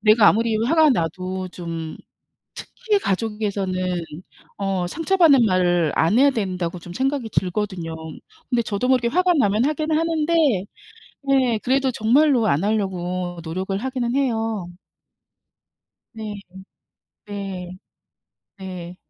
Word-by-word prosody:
'내가 215 -1 +6
아무리 225 0 +2
화가 310 +8 +4
나도 185 - -2
좀 165 -3 -6 0.6
특히 440 -4 -2
가족에서는 195 - -2 0.6
어 195 -3 -1
상처받는 325 - +4
말을 175 -5 +2
안 170 +8 +3
해야 280 +1 +5
된다.'고 185 -6 -3
좀 175 +1 -11
생각이 265 +1 -1
들거든요. 185 -3 -2 0.5
근데 245 -2 +2
저도 215 +3 -2
모르게 250 -2 +3
화가 360 +5 +3
나면 215 - +2
하긴 310 +1 -1
하는데 325 0 +1 0.9
네 260 -5 +2
그래도 265 +1 +2
정말로 245 +1 +3
안 150 -1 +1
하려고 185 -4 -2
노력을 185 +4 -3
하기는 250 +2 -2
해요. 225 -8 -1 1.5
네. 215 -2 -6 0.9
네. 190 -3 -6 0.8
네. 180 -2 -8
210 Hz, 240 characters per minute, -22 LUFS, 185-260 Hz, 1.5 s, 내가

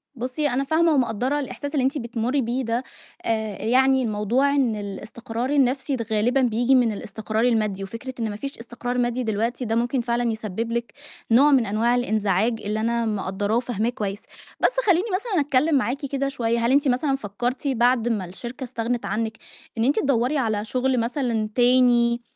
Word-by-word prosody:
بُصّي 260 +5 -2
أنا 260 +2 0
فاهمة 320 +3 +3
ومقدّرة 255 +2 +1
الإحساس 285 +2 -5
اللي 275 - +1
أنتِ 270 +4 +1
بتمُري 240 +2 -1
بيه 245 +2 -1
ده، 235 +2 -1 0.4
آآ 220 -3 -1
يعني 265 +2 +4
الموضوع 225 +5 +1
إن 255 -6 +2
الاستقرار 225 +4 -5
النفْسي 275 -1 +1
غالبًا 240 +5 +2
بييجي 245 +2 +3
من 245 -3 +3
الاستقرار 215 +2 -3
المادي، 215 -5 +1
وفكرة 230 +6 -7
إن 225 -2 -1
ما 205 - -5
فيش 275 +6 -6
استقرار 245 +1 -5
مادي 245 0 0
دلوقتي 230 +3 -1
ده 225 - -1
ممكن 240 +2 +1
فعلًا 235 0 0
يسبب 220 +1 -4
لِك 235 0 -3 0.4
نوع 280 +6 +6
من 255 -4 +4
أنواع 230 +4 +1
الانزعاج 220 -1 +1
اللي 210 +1 -2
أنا 235 +1 0
مقدّراه 205 0 -1
وفاهماه 235 -2 -1
كويس، 205 -4 -4 0.4
بس - - +4 0.2
خلّيني 370 0 +3
مثلًا 400 -5 0
أتكلِّم 285 +2 +2
معاكِ 265 +3 0
كده 275 0 -1
شوية، 235 -3 -1
هل 245 - +2
أنتِ 285 +1 +3
مثلًا 270 +2 +1
فكَّرتِ 245 +4 -3
بعد 245 -2 +2
ما 215 -6 -1
الشركة 240 +9 -8
استغنِت 240 -1 -3
عنِك 220 +2 -2 0.4
إن 225 - +1
أنتِ 275 +4 +2
تدوّري 270 +1 +1
على 220 -4 0
شغل 255 +1 0
مثلًا 230 -3 -1
تاني 240 -1 +4
240 Hz, 175 wpm, -23 LUFS, 225-265 Hz, 0.4 s, نوع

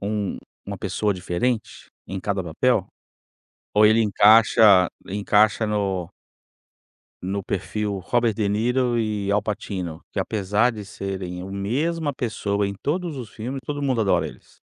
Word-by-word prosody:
um 100 -1 -2 0.3
uma - - -5
pessoa 105 -1 -1
diferente 95 +6 -2 0.2
em 95 -1 -5
cada 100 -2 -1
papel 95 +5 +1 0.9
ou 105 0 +6
ele 110 +2 +5
encaixa 105 -2 +6 0.2
ele 100 - -4
encaixa 105 +2 +3
no 95 -5 -1 1.1
no 100 +2 -2
perfil 100 +2 -3
Robert 120 -3 +2
De 105 -2 0
Niro 120 +3 +1
e 105 -3 -1
Al 105 - +2
Pacino, 95 -6 -4
que - - -4
apesar 105 +4 +1
de 105 -2 -7
serem 95 -3 -5
a 95 - -7
mesma 145 +11 -1
pessoa 105 -5 -1
em 100 - -4
todos 160 - -3
os 120 -5 -7
filmes, 130 +5 -5
todo 145 +1 -4
mundo 130 -4 +1
adora 90 -6 +2
eles. - - -14
105 Hz, 145 wpm, -23 LUFS, 100-115 Hz, 1.1 s, ou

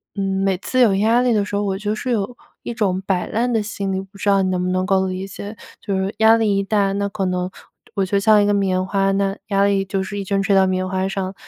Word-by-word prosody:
嗯， 195 -1 -1
每 195 -1 +1
次 255 +7 0
有 220 -5 +5
压 225 +5 +3
力 250 -1 +2
的 210 -2 +2
时 205 - -4
候， 205 - 0
我 195 -1 -1
就 210 +1 -2
是 250 +3 -3
有 225 +1 -1 0.3
一 240 - -4
种 195 -5 0
摆 185 -2 0
烂 240 +2 0
的 220 - +1
心 200 -2 -3
理， 190 - -1
不 195 +1 -15
知 200 +1 -1
道 195 -1 +4
你 190 - 0
能 180 -1 -1
不 180 - -1
能 185 0 0
够 190 -1 +2
理 185 +1 -4
解？ 205 +2 -8 0.2
就 200 - -3
是 190 +2 -2
压 220 +1 +6
力 215 -3 +1
一 - - +2
大， 200 -1 +1
那 200 +1 -1
可 200 0 -4
能 180 0 -1 0.5
我 195 - +1
就 200 +1 +1
像 210 0 +5
一 - - +2
个 205 - +2
棉 185 -2 +1
花， 195 0 +1
那 195 0 0
压 200 -2 +2
力 200 -1 +2
就 190 0 -2
是 205 +2 -5
一 - - -3
直 200 +1 0
吹 195 0 +1
到 190 -1 +5
棉 185 0 -1
花 190 0 -1
上， 195 -1 -3
195 Hz, 305 characters per minute, -20 LUFS, 190-205 Hz, 0.5 s, 压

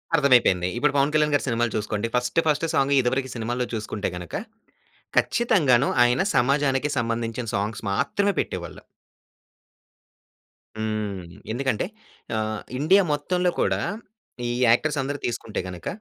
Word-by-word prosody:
అర్థమైపోయింది. 120 - +4
ఇప్పుడు 145 +3 +2
పవన్ 140 +2 +3
కళ్యాణ్ 150 -1 +2
గారి - - 0
సినిమాలు 120 -1 0
చూసుకోండి. 105 +1 -2
ఫస్ట్, 125 +6 +1
ఫస్ట్ 150 +2 +2
సాంగు 140 -1 +3
ఇదివరకు 130 +1 -1
సినిమాల్లో 120 +2 -2
చూసుకుంటే 110 -2 -3
గనక, 90 -2 -8 0.9
ఖచ్చితంగాను 145 - +3 0.2
ఆయన 125 +7 +2
సమాజానికి 140 +2 +2
సంబంధించిన 115 +1 -2
సాంగ్స్ 105 +3 -2
మాత్రమే 200 - +1
పెట్టేవాళ్ళు. 85 -4 -5 2.0
హ్మ్. 105 -4 -3 0.3
ఎందుకంటే, 130 0 -1 0.5
ఆహ్, 110 0 -2 0.2
ఇండియా 190 +7 +5
మొత్తంలో 180 +5 0
కూడా - - +1 0.7
ఈ - - -2 0.2
యాక్టర్స్ 145 +5 +2
అందరూ 145 +2 -3
తీసుకుంటే 115 -2 -3
గనుక, 90 -2 -8
125 Hz, 120 wpm, -24 LUFS, 110-145 Hz, 2.0 s, ఇండియా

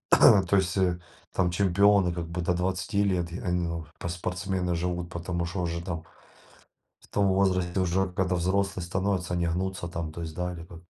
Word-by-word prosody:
То 95 -1 +6
есть, 95 -1 +1
э, 90 -2 +1 0.3
там 90 -2 +1
чемпионы 100 0 +4
как 85 -1 -4
бы 85 +1 -3
до 90 +1 +1
20 95 +3 0
лет 90 -3 0
и, 90 - -5
а, 90 - -4
и, - - +1
ну, 85 -2 -1
в 80 +1 -17
по - - -4
спортсмены 90 +1 -2
живут. 90 0 -2
Потому 85 0 -3
что 90 +2 -3
уже 85 0 -2
там 80 -3 -4 1.0
в - - -21
том 100 -1 +2
возрасте, 95 -1 +2
уже 95 +1 +1
когда 90 -1 0
взрослые 95 0 0
становятся, 95 0 -1
они 85 -1 +1
гнутся 90 +1 -2
там. 85 -2 -4
То 85 +2 -7
есть, 80 -1 -6
да, 90 0 -2
либо 85 0 -10
90 Hz, 195 wpm, -27 LUFS, 85-95 Hz, 1.0 s, То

